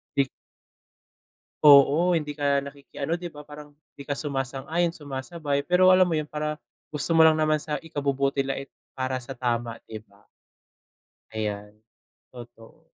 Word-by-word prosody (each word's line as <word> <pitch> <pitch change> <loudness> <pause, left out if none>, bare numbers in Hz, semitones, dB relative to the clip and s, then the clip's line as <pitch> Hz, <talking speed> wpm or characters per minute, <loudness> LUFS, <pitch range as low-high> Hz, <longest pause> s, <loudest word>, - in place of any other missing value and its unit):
di 140 -1 +2 1.4
Oo, 145 +4 +7
hindi 150 -1 -6
ka 140 -1 +1
nakikiano 140 +2 -5
'di 175 0 -5
ba, 150 -1 -12
parang 150 0 -11 0.2
hindi 140 - -10
ka 140 0 -4
sumasang-ayon, 140 +4 -2
sumasabay, 145 0 -4
pero 185 +2 +5
alam 185 -1 +4
mo 160 - +1
yun, 150 - -3
para 150 0 -4 0.3
gusto 150 +2 +1
mo 165 - +7
lang 160 -1 +6
naman 155 -1 +1
sa 150 -1 -3
ikabubuti 140 -3 -1
la 135 0 -3
and 135 - -7 0.3
para 130 0 -1
sa 125 - -9
tama, 120 -2 -2
'di 110 -1 -8
ba? 100 +1 -25 1.0
Ayan. 105 -1 -5 0.5
Totoo. 120 +6 -14
145 Hz, 150 wpm, -25 LUFS, 135-155 Hz, 1.4 s, Oo